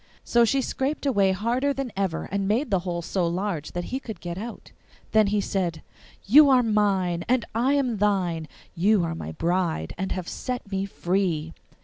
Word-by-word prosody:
So 235 Hz, 0 st, +4 dB
she 270 Hz, +3 st, +1 dB
scraped 275 Hz, +4 st, -2 dB
away 200 Hz, -8 st, +3 dB
harder 240 Hz, +8 st, 0 dB
than 270 Hz, -2 st, -3 dB
ever, 190 Hz, -4 st, -1 dB
and 195 Hz, 0 st, -1 dB
made 230 Hz, +5 st, 0 dB
the 190 Hz, -, +3 dB
hole 175 Hz, -1 st, -4 dB
so 180 Hz, 0 st, 0 dB
large 175 Hz, -3 st, -3 dB
that 175 Hz, -, -2 dB
he 260 Hz, -, 0 dB
could 225 Hz, -5 st, -8 dB
get 175 Hz, -1 st, -5 dB
out. 225 Hz, +5 st, -8 dB, 0.4 s
Then 215 Hz, -1 st, +4 dB
he 205 Hz, +1 st, +1 dB
said, 180 Hz, -5 st, -2 dB, 0.4 s
'You 285 Hz, +8 st, +8 dB
are 255 Hz, -2 st, +5 dB
mine, 195 Hz, -6 st, +1 dB
and 255 Hz, -2 st, +2 dB
I 250 Hz, +5 st, +2 dB
am 255 Hz, -6 st, 0 dB
thine; 185 Hz, -6 st, 0 dB, 0.3 s
you 195 Hz, +2 st, +3 dB
are 165 Hz, 0 st, -2 dB
my 80 Hz, -, -6 dB
bride 170 Hz, -, -1 dB
and 190 Hz, 0 st, -2 dB
have 185 Hz, -2 st, -3 dB
set 250 Hz, -5 st, -5 dB
me 195 Hz, 0 st, -1 dB
free! 175 Hz, -4 st, -1 dB
195 Hz, 190 wpm, -25 LUFS, 175-235 Hz, 0.4 s, You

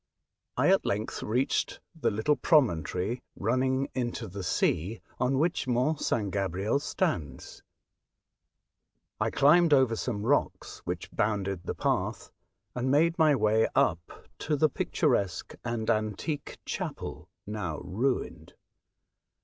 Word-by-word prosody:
I -, -, +4 dB
at -, -, +4 dB
length 105 Hz, +2 st, -2 dB
reached 125 Hz, +5 st, 0 dB
the 165 Hz, -, 0 dB
little 110 Hz, +8 st, +1 dB
promontory 115 Hz, -, +1 dB
running 130 Hz, +5 st, +1 dB
into 120 Hz, -2 st, -3 dB
the 100 Hz, +1 st, -6 dB
sea, 90 Hz, +3 st, 0 dB, 0.2 s
on 130 Hz, +1 st, +1 dB
which 160 Hz, -2 st, 0 dB
Mont 130 Hz, +5 st, +1 dB
St. 105 Hz, -4 st, 0 dB
Gabriel 100 Hz, +5 st, 0 dB
stands. 150 Hz, -, -3 dB, 1.6 s
I -, -, +1 dB
climbed 155 Hz, +2 st, +5 dB
over 130 Hz, -4 st, +3 dB
some 110 Hz, -3 st, -3 dB
rocks 145 Hz, +4 st, 0 dB
which -, -, -4 dB
bounded 100 Hz, -4 st, -1 dB
the -, -, -3 dB
path -, -, -1 dB, 0.4 s
and 125 Hz, +1 st, -1 dB
made 165 Hz, +5 st, +3 dB
my 155 Hz, -2 st, +5 dB
way 110 Hz, -1 st, +3 dB
up 85 Hz, 0 st, 0 dB
to 150 Hz, -, 0 dB
the 155 Hz, +2 st, +3 dB
picturesque 125 Hz, -, 0 dB
and 115 Hz, -2 st, -3 dB
antique 110 Hz, -, -2 dB
chapel, 75 Hz, +5 st, -5 dB, 0.2 s
now 100 Hz, -7 st, -4 dB
ruined. 115 Hz, +9 st, -2 dB
115 Hz, 120 wpm, -29 LUFS, 100-140 Hz, 1.6 s, climbed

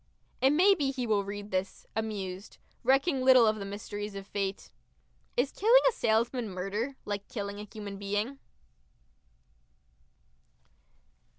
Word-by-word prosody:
It 265 Hz, -, +6 dB
may 360 Hz, +8 st, +6 dB
be 290 Hz, -8 st, 0 dB
he 260 Hz, -2 st, -3 dB
will 210 Hz, -3 st, +2 dB
read 205 Hz, +1 st, -7 dB
this 185 Hz, +1 st, -3 dB
amused 200 Hz, -3 st, -4 dB, 0.3 s
recking 270 Hz, +3 st, +3 dB
little 255 Hz, -2 st, +7 dB
of 215 Hz, 0 st, +2 dB
the 200 Hz, -, -5 dB
mysteries 205 Hz, +1 st, -6 dB
of 195 Hz, 0 st, -6 dB
fate.... 195 Hz, -1 st, -4 dB, 0.7 s
Is 255 Hz, +3 st, +2 dB
killing 475 Hz, +5 st, +5 dB
a -, -, +5 dB
salesman 230 Hz, -, 0 dB
murder, 200 Hz, +8 st, -3 dB
like 205 Hz, -1 st, -4 dB
killing 200 Hz, -2 st, -5 dB
a 210 Hz, -, -7 dB
human 205 Hz, -2 st, -7 dB
being? 205 Hz, +7 st, -2 dB
215 Hz, 130 wpm, -30 LUFS, 200-260 Hz, 0.7 s, little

